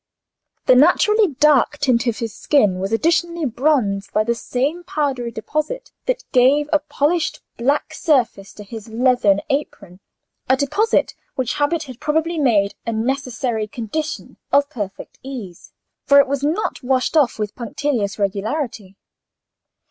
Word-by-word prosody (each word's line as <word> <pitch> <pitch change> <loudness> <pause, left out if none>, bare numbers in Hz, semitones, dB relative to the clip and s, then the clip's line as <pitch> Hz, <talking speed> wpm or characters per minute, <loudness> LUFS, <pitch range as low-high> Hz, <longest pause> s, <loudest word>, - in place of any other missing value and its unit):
The - - +6
naturally 395 - +4
dark 295 0 +3
tint 255 -4 +1
of 230 - 0
his 230 -3 -4
skin 205 -11 +2
was 195 +2 -3
additionally 335 +6 +1
bronzed 230 -7 0
by 215 - +2
the 235 +2 0
same 275 +8 -2
powdery 275 -8 -2
deposit 305 - -4 0.2
that - - -1
gave 275 +3 +4
a 305 - +5
polished 300 +3 -1 0.2
black 280 +5 0
surface 250 - 0
to 210 - -10
his 220 +2 -9
leathern 225 -4 +2
apron: 200 -10 -4 0.5
a 260 - +4
deposit 405 +12 +1 0.2
which 255 -3 -1
habit 315 +3 +1
had 255 -5 -11
probably 320 +2 0
made 210 -8 +2
a 230 - -3
necessary 240 -1 -2
condition 255 +8 -5
of 285 +1 +3
perfect 205 -7 -7
ease, 235 -10 -9 0.4
for 280 - +6
it 280 - +6
was 280 0 -2
not 320 +9 -1
washed 260 +3 0
off 285 -6 +3
with 210 -2 -3
punctilious 250 -5 -2
regularity. 205 +1 -3
260 Hz, 140 wpm, -20 LUFS, 225-300 Hz, 0.5 s, The